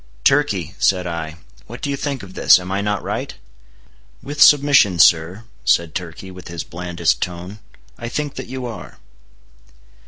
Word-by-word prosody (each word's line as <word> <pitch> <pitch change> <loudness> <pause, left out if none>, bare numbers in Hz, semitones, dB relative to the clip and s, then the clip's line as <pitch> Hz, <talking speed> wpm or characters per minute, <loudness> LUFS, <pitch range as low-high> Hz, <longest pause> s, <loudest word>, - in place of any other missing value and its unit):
"Turkey," 100 - +2
said 90 -1 +2
I, 80 -2 -5 0.3
"what 120 +3 -9
do 140 - -3
you - - -1
think 140 -3 -4
of 95 -1 -11
this? - - +5
Am 90 +1 -7
I 100 +1 -1
not 105 -1 -2
right?" - - -4 0.9
"With 145 +1 -5
submission, 140 -10 +6
sir," 85 +5 +4 0.2
said 85 -2 +2
Turkey, 90 +1 -7
with 90 0 -12
his 85 -1 -5
blandest 85 -1 -2
tone, 90 +4 -5 0.4
"I 115 - -5
think 145 +2 -3
that - - -7
you 130 0 -6
are." 115 -2 -8
95 Hz, 160 wpm, -20 LUFS, 85-130 Hz, 0.9 s, submission